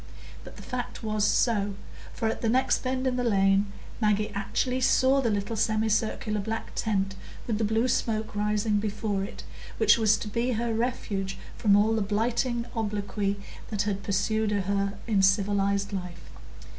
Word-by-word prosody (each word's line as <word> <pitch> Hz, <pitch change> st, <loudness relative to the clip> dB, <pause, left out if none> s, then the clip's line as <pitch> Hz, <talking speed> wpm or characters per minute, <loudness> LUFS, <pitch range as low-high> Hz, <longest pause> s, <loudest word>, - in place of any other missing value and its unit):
But -, -, -11 dB
the -, -, -11 dB
fact 250 Hz, -2 st, -5 dB
was 215 Hz, -1 st, 0 dB
so, 205 Hz, -4 st, +1 dB, 0.4 s
for 225 Hz, -, -2 dB
at 220 Hz, -, -2 dB
the 230 Hz, -, +1 dB
next 255 Hz, +3 st, +2 dB
bend 260 Hz, 0 st, -2 dB
in 255 Hz, -1 st, +1 dB
the 250 Hz, -, 0 dB
lane 195 Hz, -2 st, +3 dB, 0.3 s
Maggie 210 Hz, 0 st, +2 dB
actually 250 Hz, +6 st, -1 dB
saw 265 Hz, +2 st, +4 dB
the 235 Hz, -, +1 dB
little 205 Hz, +1 st, -1 dB
semicircular 215 Hz, 0 st, 0 dB
black 220 Hz, +3 st, -4 dB
tent 195 Hz, -3 st, 0 dB, 0.3 s
with 220 Hz, -3 st, -1 dB
the -, -, +1 dB
blue 220 Hz, +3 st, +2 dB
smoke 220 Hz, -3 st, -1 dB
rising 210 Hz, 0 st, +1 dB
before 210 Hz, -1 st, -2 dB
it, 200 Hz, -, -7 dB, 0.3 s
which -, -, +5 dB
was 215 Hz, -1 st, +4 dB
to -, -, -6 dB
be 235 Hz, +4 st, 0 dB
her 230 Hz, +1 st, -1 dB
refuge 205 Hz, -5 st, -2 dB, 0.2 s
from 205 Hz, -3 st, +4 dB
all 210 Hz, +2 st, +4 dB
the 220 Hz, -, +1 dB
blighting 235 Hz, +4 st, 0 dB
obloquy 205 Hz, -2 st, -2 dB, 0.3 s
that 205 Hz, -2 st, 0 dB
had 200 Hz, -1 st, -2 dB
pursued 210 Hz, +2 st, 0 dB
her 200 Hz, 0 st, -1 dB
in 210 Hz, -4 st, +2 dB
civilised 200 Hz, +1 st, +2 dB
life. 180 Hz, -3 st, -6 dB
210 Hz, 165 wpm, -27 LUFS, 200-225 Hz, 0.4 s, which